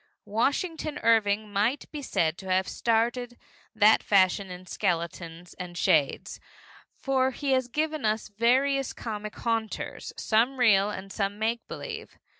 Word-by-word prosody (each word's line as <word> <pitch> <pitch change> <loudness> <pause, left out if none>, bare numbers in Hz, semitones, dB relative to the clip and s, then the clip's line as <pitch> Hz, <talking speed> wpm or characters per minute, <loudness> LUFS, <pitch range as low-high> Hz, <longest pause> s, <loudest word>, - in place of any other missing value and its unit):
Washington 295 - -1
Irving 215 -2 +2
might 220 +8 +1
be 300 - -5
said 160 - 0
to 190 - -8
have 185 0 +2
started 240 +1 0 0.4
that 220 0 +6
fashion 195 0 +3
in 180 0 -9
skeletons 170 -2 -3
and 175 -1 -7
shades, 150 -4 +1 0.6
for 265 -1 +1
he 275 +1 -3
has 260 -1 +2
given 305 +3 -2
us 215 0 0
various 255 +6 +1
comic 215 -2 -6
haunters, 225 -2 -3
some 235 +5 +2
real 210 -5 +4
and 195 -1 -7
some 200 -1 -2
make 225 +2 -2
believe. 450 -2 -7
220 Hz, 135 wpm, -27 LUFS, 195-260 Hz, 0.6 s, that